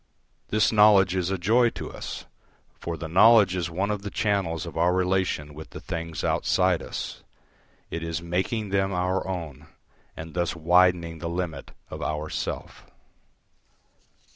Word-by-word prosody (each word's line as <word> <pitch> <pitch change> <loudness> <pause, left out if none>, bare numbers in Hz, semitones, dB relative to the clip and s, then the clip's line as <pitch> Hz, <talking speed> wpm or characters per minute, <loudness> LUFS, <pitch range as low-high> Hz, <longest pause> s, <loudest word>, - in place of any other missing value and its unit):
This 105 -1 +2
knowledge 105 -4 +6
is 90 -1 0
a 95 - -1
joy 115 +7 +3
to - - -6
us, - - -7 0.5
for 85 -1 -4
the 80 +1 -5
knowledge 100 +2 +6
is 85 -2 -2
one 95 +5 -1
of 105 -1 -3
the 100 - -5
channels 95 -6 -1
of 85 - -8
our 85 +2 +3
relation 90 -5 0
with 80 +2 -10
the - - -9
things 85 -1 -5
outside - - +2
us; - - -6 0.7
it 85 - -3
is 80 -1 -3
making 95 +6 -2
them 95 0 +1
our 90 +1 -1
own, 80 -6 -6 0.5
and 80 0 -8
thus 85 -1 -1
widening 85 0 +3
the 85 +1 -4
limit 85 -5 -4 0.2
of - - -6
our 75 0 -3
self. - - -5
90 Hz, 155 wpm, -26 LUFS, 80-95 Hz, 0.7 s, knowledge